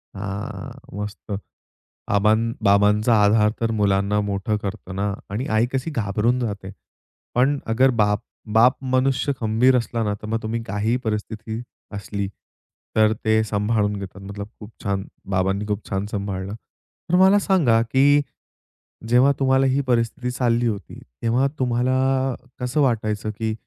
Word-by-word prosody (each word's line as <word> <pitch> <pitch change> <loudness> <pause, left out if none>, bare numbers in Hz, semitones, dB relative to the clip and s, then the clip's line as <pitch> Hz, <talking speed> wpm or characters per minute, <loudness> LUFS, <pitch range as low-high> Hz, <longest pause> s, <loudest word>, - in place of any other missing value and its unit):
हां. 100 0 -5 0.3
मस्त. 105 0 -7 0.9
आबां 105 +2 +4 0.3
बाबांचा 105 +3 +4
आधार 105 +1 +4
तर 115 0 +1
मुलांना 100 0 +2
मोठं 100 +2 -1
करतं 95 -2 -5
ना. 100 0 0 0.2
आणि 110 +7 -3
आई 115 - +3
कशी 135 +4 -2
घाबरून 115 -1 0
जाते. 100 -5 -4 0.6
पण 135 +4 +3
अगर 130 +4 +4
बाप 105 0 +1 0.4
बाप 125 +3 +6 0.2
मनुष्य 135 +2 +2
खंबीर 115 +4 +3
असला 115 -1 -1
ना, 105 - 0
तर 105 - -9
मग 115 +1 -1
तुम्ही 115 +1 -2
काहीही 105 +5 0
परिस्थिती 110 +1 -3 0.3
असली, 100 0 -4 0.7
तर 110 0 +5
ते 110 0 +3
सांभाळून 105 0 0
घेतात. 100 0 -8
मतलब 100 +1 -7
खूप 105 +1 -10
छान 100 -1 0 0.3
बाबांनी 95 +2 0
खूप 105 0 -3
छान 100 0 -1
सांभाळलं. 100 -1 -4 0.5
तर 180 - +3
मला 190 +2 +6
सांगा, 170 - +3
की 140 +5 +4 0.9
जेव्हा 125 +3 +5
तुम्हाला 135 0 +3
ही 135 +2 +2
परिस्थिती 120 +1 0
चालली 120 -1 +1
होती, 105 -3 -5 0.2
तेव्हा 120 +4 +2
तुम्हाला 130 +1 +1 0.2
कसं 125 +4 0
वाटायचं? 110 -4 0
की 110 +1 -3
110 Hz, 140 wpm, -22 LUFS, 105-125 Hz, 0.9 s, बाप